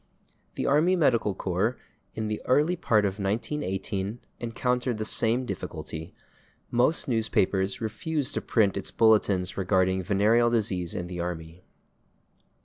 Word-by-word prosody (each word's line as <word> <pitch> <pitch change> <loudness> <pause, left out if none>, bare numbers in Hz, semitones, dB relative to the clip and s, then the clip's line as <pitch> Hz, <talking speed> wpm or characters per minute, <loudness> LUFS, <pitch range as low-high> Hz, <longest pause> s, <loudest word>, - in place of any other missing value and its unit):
The - - -2
Army 155 +6 +3
Medical 120 - +2
Corps, 95 +7 -1 0.4
in 110 -1 -2
the 105 0 -3
early 150 +7 +3
part 110 -11 +2
of 100 +1 -2
1918, 100 -1 -2 0.2
encountered 125 +1 -1
the 110 - -3
same 115 +3 +1
difficulty: 80 -8 -6 0.6
most 125 +7 +2
newspapers 100 -5 +1
refused 145 +6 -2
to - - -1
print 100 -4 +2
its 100 - -3
bulletins 105 -5 +2
regarding 95 -1 +2
venereal 105 +5 +3
disease 95 -7 -1
in 90 - -3
the 90 0 -6
army. 85 0 -5
110 Hz, 130 wpm, -27 LUFS, 95-120 Hz, 0.6 s, Army